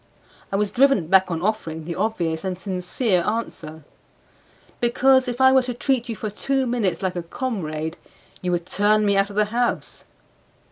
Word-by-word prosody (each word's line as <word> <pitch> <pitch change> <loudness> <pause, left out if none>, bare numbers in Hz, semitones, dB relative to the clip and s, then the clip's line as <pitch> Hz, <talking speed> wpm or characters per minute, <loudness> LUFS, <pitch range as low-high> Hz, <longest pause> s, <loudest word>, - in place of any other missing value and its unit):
I - - -1
was 205 0 0
driven 270 -9 +3
back 190 +2 +4
on 165 0 -3
offering 165 -7 -2
the 170 - -4
obvious 170 -5 -1
and 185 -2 -3
sincere 185 +1 -1
answer 160 -8 -4 1.0
"Because 260 +2 +3
if 245 0 -4
I 260 0 +6
were 265 0 +5
to 250 -1 -5
treat 245 -1 0
you 225 - -3
for 215 0 -5
two 270 +5 -1
minutes 235 -7 -1
like 185 -1 -1
a 175 - -2
comrade 165 -6 -4 0.4
you 180 - -1
would 175 -1 -1
turn 210 +3 +2
me 200 -1 +2
out 195 +1 +2
of 200 - -10
the 210 0 +3
house." 240 0 -2
205 Hz, 180 wpm, -23 LUFS, 175-240 Hz, 1.0 s, I